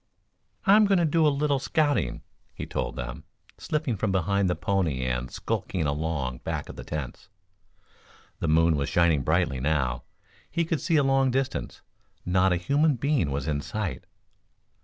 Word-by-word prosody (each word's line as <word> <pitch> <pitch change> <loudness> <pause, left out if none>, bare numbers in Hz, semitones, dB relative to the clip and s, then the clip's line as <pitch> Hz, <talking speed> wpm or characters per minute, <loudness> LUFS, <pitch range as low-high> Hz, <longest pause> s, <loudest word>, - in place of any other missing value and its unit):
"I'm 210 +1 +6
going 195 -1 +3
to 170 - +3
do 160 0 +3
a - - +6
little 145 -1 +1
scouting," 145 - 0 0.3
he - - -5
told - - -3
them, - - -6 0.4
slipping 150 -6 -1
from 105 +1 0
behind 95 +1 +1
the 90 - +1
pony 85 -7 -1
and 60 0 -2
skulking 85 -4 -3
along 70 -4 -2
back - - -4
of - - -8
the - - -8
tents. 75 +3 -6 1.1
The - - -2
moon 80 +1 +4
was 70 -1 -1
shining 85 -5 +3
brightly 80 -1 +1
now. 65 -4 0 0.5
He 170 +2 0
could 160 -2 -1
see 165 - +1
a 145 - +4
long 135 -1 +3
distance. 130 +1 -2 0.4
Not 90 +1 +3
a - - +3
human 140 - +2
being 135 - +1
was 70 +1 -3
in 70 -2 -1
sight. 105 -1 -4
90 Hz, 165 wpm, -26 LUFS, -, 1.1 s, I'm